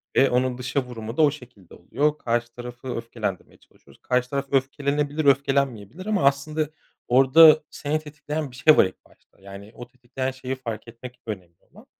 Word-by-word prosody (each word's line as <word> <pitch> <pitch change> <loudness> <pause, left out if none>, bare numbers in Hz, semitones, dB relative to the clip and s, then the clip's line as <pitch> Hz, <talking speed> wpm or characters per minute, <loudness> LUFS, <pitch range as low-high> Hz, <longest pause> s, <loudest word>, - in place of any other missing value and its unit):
ve 135 - +5
onun 125 0 0
dışa 125 +2 -2
vurumu 115 -2 -8
da - - +4
o 145 -2 +5
şekilde 125 - -14
oluyor. 150 +11 -1
Karşı 120 0 -2
tarafı 120 +1 -9
öfkelendirmeye 115 -5 -5
çalışıyoruz. - - -23
Karşı 125 0 0
taraf 140 0 -2
öfkelenebilir, 140 +2 0
öfkelenmeyebilir 140 - +1
ama 210 -7 0
aslında 145 +2 +1 0.4
orada 150 +5 +7
seni 150 +2 -2
tetikleyen 150 -1 -6
bir - - -14
şey 150 +5 +5
var - - +7
ilk 95 - -9
başta. - - -28
Yani, 100 +1 -11
o 120 - -9
tetikleyen 125 +1 -5
şeyi 130 0 -5
fark 115 -4 -7
etmek 125 +2 -11
önemli 90 -6 -7 0.2
olan. - - -17
130 Hz, 170 wpm, -24 LUFS, 120-145 Hz, 0.4 s, orada